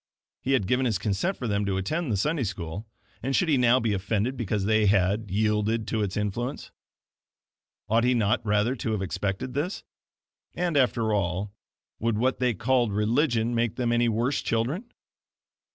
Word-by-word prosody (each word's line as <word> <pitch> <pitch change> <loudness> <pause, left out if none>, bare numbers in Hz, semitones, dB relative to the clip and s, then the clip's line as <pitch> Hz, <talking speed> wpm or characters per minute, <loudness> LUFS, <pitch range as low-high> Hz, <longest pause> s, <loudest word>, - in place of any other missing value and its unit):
He 135 - 0
had 130 -8 +2
given 125 +5 +1
his 110 -5 +1
consent 105 - -1
for 125 - -4
them 100 -1 0
to 95 -1 0
attend 150 - -2
the 105 - +1
Sunday 150 - 0
School, 95 0 -5 0.3
and 135 +2 -1
should 180 - +2
he 150 - +4
now 125 0 +4
be 115 -3 0
offended 105 +6 -1
because 105 -5 -1
they 110 0 +3
had 100 +2 +2
yielded 105 +2 0
to 110 - 0
its 100 -2 -2
influence? 115 +6 -3 1.2
Ought 115 +3 +3
he 125 +1 +3
not 110 0 +1
rather 105 +4 +1
to 110 0 -2
have 100 -3 -1
expected 100 +6 -3
this? 155 +8 -2 0.7
And 175 -2 -1
after 120 -5 +2
all, 100 +1 -1 0.5
would 115 -1 0
what 130 +4 +1
they 125 -3 +1
called 120 +1 +1
religion 115 +3 +1
make 115 -2 0
them 120 -2 0
any 120 0 +3
worse 120 +5 0
children? 140 - -2
115 Hz, 175 wpm, -26 LUFS, 105-125 Hz, 1.2 s, he